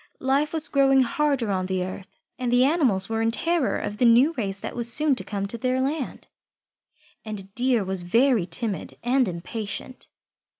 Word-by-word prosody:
Life 275 +3 +1
was 320 -1 +1
growing 270 -1 +4
harder 270 -4 0
on 185 -1 -1
the 185 -1 -1
earth, 185 +1 -9 0.2
and 250 -1 -1
the 245 +1 +4
animals 260 - +2
were 225 0 -2
in 225 - +2
terror 330 +4 0
of 205 0 -5
the 245 - +2
new 245 +7 +5
race 200 -8 -3
that - - -7
was 235 -1 +3
soon 300 +3 +4
to 255 - -4
come 200 -2 -4
to 230 +4 -6
their 255 +2 0
land, 275 +1 -3 1.0
and 195 -3 -7
Deer 245 -2 +1
was 190 -1 +2
very 230 +2 +2
timid 195 +4 -4
and 250 0 +2
impatient. 200 +7 -6
235 Hz, 180 wpm, -24 LUFS, 200-270 Hz, 1.0 s, new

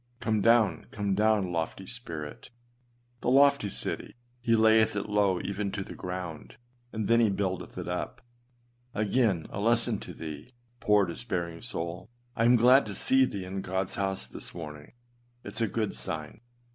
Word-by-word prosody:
Come 110 -2 0
down, 115 -2 +3
come 100 -2 -1
down, 105 -2 +2
lofty 85 +3 -3
spirit! 85 -10 -7 0.7
The - - -1
lofty 140 -4 +5
city, - - -4 0.2
he 115 -1 +2
layeth 110 -1 +5
it 100 - -2
low 100 -3 +2
even 100 +1 -3
to 100 - -2
the - - -9
ground, 90 -3 -6 0.4
and 110 -2 -2
then 115 0 +5
he 115 -2 +4
buildeth 95 -2 -2
it - - -5
up. - - -3 0.8
Again, 105 -5 +1
a - - -4
lesson 115 0 +2
to - - -8
thee, 80 - -8 0.2
poor 105 -2 +4
despairing 85 -3 -4
souk 85 -7 -5 0.3
I 115 - +2
am 120 +1 +6
glad 125 +2 +6
to 100 - -4
see 130 0 +4
thee 100 -6 -5
in 95 +1 -4
Godâs 95 0 -2
house 95 -1 0
this - - -7
morning; 75 -1 -8 0.5
it 105 - -8
is 115 - -3
a 115 - +3
good 110 0 -1
sign. 75 - -6
100 Hz, 170 wpm, -29 LUFS, 90-115 Hz, 0.8 s, am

